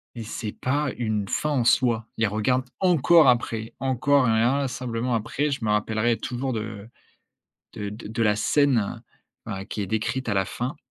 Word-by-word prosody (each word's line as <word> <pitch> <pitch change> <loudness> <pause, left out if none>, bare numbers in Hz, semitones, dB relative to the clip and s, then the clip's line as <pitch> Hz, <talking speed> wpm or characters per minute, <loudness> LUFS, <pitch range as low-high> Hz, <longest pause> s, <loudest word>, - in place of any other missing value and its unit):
mais 115 - -5
c'est 110 0 -5
pas 140 +5 -1
une 110 -4 -2
fin 150 - 0
en 130 -5 +1
soi. 115 -2 +2
Il 110 -1 +2
regarde 125 +5 0 0.2
encore 165 -4 +5
après, 115 -2 0
encore 135 +1 +2
et - - +3
inlassablement, 125 0 0
après 130 +7 -1
je 135 -4 -3
me 105 - 0
rappellerai 110 +2 +1
toujours 130 +1 -3
de 110 -1 -5 0.8
de 105 0 -4
de 110 +2 -4
la 105 -1 +2
scène, 130 -4 +1 0.4
enfin, 95 -3 -5
qui 105 - -5
est 100 - -3
décrite 110 +5 -2
à 105 - +1
la 95 -1 +1
fin, 130 - -4
115 Hz, 170 wpm, -25 LUFS, 110-130 Hz, 0.8 s, encore